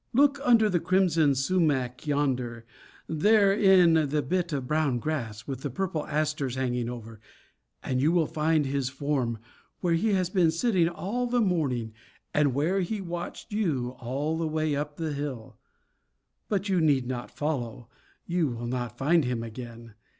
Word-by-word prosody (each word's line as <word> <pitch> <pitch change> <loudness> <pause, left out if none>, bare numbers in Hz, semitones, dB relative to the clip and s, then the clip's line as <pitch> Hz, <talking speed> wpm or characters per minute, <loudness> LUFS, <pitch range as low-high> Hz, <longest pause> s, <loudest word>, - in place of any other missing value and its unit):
Look 280 +2 +4
under 230 -5 +5
the 180 -4 +1
crimson 165 -5 +3
sumach 135 -4 0
yonder, 125 -5 -1 0.4
there 200 +5 +4
in 180 -7 +5
the 150 +1 0
bit 180 -1 -1
of 140 -4 -2
brown 150 -2 +1
grass, 115 -5 -4
with 135 -2 -5
the 145 - -3
purple 160 +2 -3
asters 150 -4 -1
hanging 125 -2 -1
over, 115 -2 -8 0.6
and 130 -1 -1
you 150 +4 +3
will 170 -2 +3
find 155 0 +1
his 135 -1 -1
form, 135 -4 -1 0.4
where 175 -2 +1
he 205 +6 +2
has 185 -2 0
been 180 -4 +4
sitting 170 0 +2
all 225 +8 -3
the 245 0 +1
morning 140 - 0 0.4
and 145 -4 +2
where 165 +8 +1
he 205 +4 -2
watched 175 +3 -6
you 150 - 0
all 145 +6 -2
the 165 - 0
way 155 -1 0
up 145 +1 -4
the 160 -2 -2
hill. 140 -5 -6 0.9
But 200 -1 0
you 185 -3 +2
need 140 -5 +3
not 125 -1 -4
follow; 125 -6 -3 0.4
you 175 -2 +1
will 120 -2 -5
not 120 -1 -3
find 160 +5 +3
him 120 -2 -2
again. 115 0 -9
150 Hz, 165 wpm, -27 LUFS, 125-175 Hz, 0.9 s, under